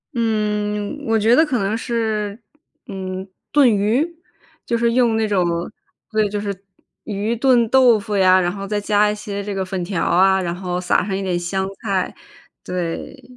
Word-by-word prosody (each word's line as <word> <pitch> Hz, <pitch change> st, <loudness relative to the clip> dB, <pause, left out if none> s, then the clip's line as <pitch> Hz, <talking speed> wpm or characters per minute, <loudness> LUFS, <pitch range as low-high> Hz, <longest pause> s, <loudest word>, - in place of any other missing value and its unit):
嗯， 210 Hz, +2 st, -1 dB
我 225 Hz, 0 st, +3 dB
觉 225 Hz, +3 st, +4 dB
得 320 Hz, -, +6 dB
可 280 Hz, -6 st, 0 dB
能 200 Hz, +1 st, 0 dB
是， 220 Hz, -2 st, -2 dB, 0.5 s
嗯， 190 Hz, -1 st, -6 dB, 0.2 s
炖 285 Hz, -3 st, +5 dB
鱼， 220 Hz, +10 st, +2 dB, 0.6 s
就 235 Hz, -, -1 dB
是 235 Hz, 0 st, +1 dB
用 235 Hz, -3 st, +3 dB
那 220 Hz, -, +1 dB
种 195 Hz, -4 st, +2 dB, 0.7 s
对， 215 Hz, -1 st, +1 dB
就 205 Hz, -, -3 dB
是 200 Hz, -2 st, -5 dB, 0.4 s
鱼 215 Hz, +2 st, -2 dB
炖 245 Hz, -2 st, +3 dB
豆 250 Hz, -4 st, +5 dB
腐 205 Hz, +1 st, -4 dB
呀， 185 Hz, -1 st, +5 dB
然 175 Hz, -1 st, 0 dB
后 195 Hz, 0 st, -6 dB
再 210 Hz, 0 st, -1 dB
加 210 Hz, 0 st, +2 dB
一 210 Hz, -, -1 dB
些 200 Hz, -1 st, -5 dB
这 205 Hz, -1 st, -4 dB
个 190 Hz, -, -2 dB
粉 185 Hz, -1 st, -3 dB
条 175 Hz, -2 st, -2 dB
啊， 190 Hz, +2 st, +4 dB
然 175 Hz, -2 st, -2 dB
后 180 Hz, -1 st, -3 dB
撒 180 Hz, -, +1 dB
上 195 Hz, 0 st, -2 dB
一 195 Hz, -, -3 dB
点 180 Hz, -2 st, -1 dB
香 190 Hz, +2 st, -2 dB
菜， 195 Hz, -4 st, -1 dB, 0.5 s
对， 180 Hz, +8 st, -5 dB
205 Hz, 195 characters per minute, -20 LUFS, 190-225 Hz, 0.7 s, 得